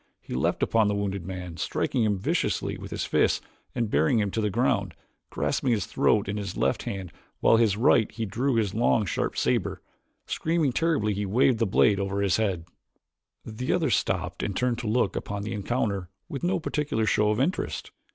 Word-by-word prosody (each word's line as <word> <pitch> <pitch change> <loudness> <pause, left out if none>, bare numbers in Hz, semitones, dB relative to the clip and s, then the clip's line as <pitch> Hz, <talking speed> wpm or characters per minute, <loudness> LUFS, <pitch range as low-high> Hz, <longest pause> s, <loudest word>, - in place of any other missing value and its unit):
He - - -9
leaped 65 - 0
upon 110 -2 +3
the 105 - +1
wounded 100 -3 -3
man, 90 -3 -6
striking 120 +7 0
him 105 -2 +1
viciously 95 - -1
with - - -8
his - - -3
fists - - +2 0.4
and, 115 - 0
bearing 80 +5 +2
him 105 -2 +1
to 110 - -1
the 105 - +1
ground, 100 - 0 0.3
grasped - - -1
his 115 -6 +2
throat 105 -2 +2
in 100 +1 -2
his 100 -3 -5
left - - +1
hand 95 -3 -5 0.3
while - - +4
with 115 - +5
his 105 -3 +2
right 110 -1 +4
he 115 -1 -3
drew 120 +6 0
his 105 -4 +1
long 115 -1 +2
sharp 85 - -2
saber. - - 0 0.5
Screaming 160 -4 0
terribly 145 -7 +1
he 100 0 -2
waved 120 +3 +3
the 115 - +2
blade 100 +1 +3
above 100 0 -2
his 100 -3 +2
head. 95 -7 -1 0.8
The 115 +3 -3
others 160 - +2
stopped - - -2
and 100 - -2
turned 125 -2 0
to 120 - -4
look 120 +4 +1
upon 100 0 -4
the 105 - -4
encounter 100 -3 -2 0.2
with 140 - -5
no 180 +1 +1
particular 150 -8 -1
show 105 0 +2
of 105 +2 +1
interest. 165 +8 -1
105 Hz, 200 wpm, -26 LUFS, 100-120 Hz, 0.8 s, with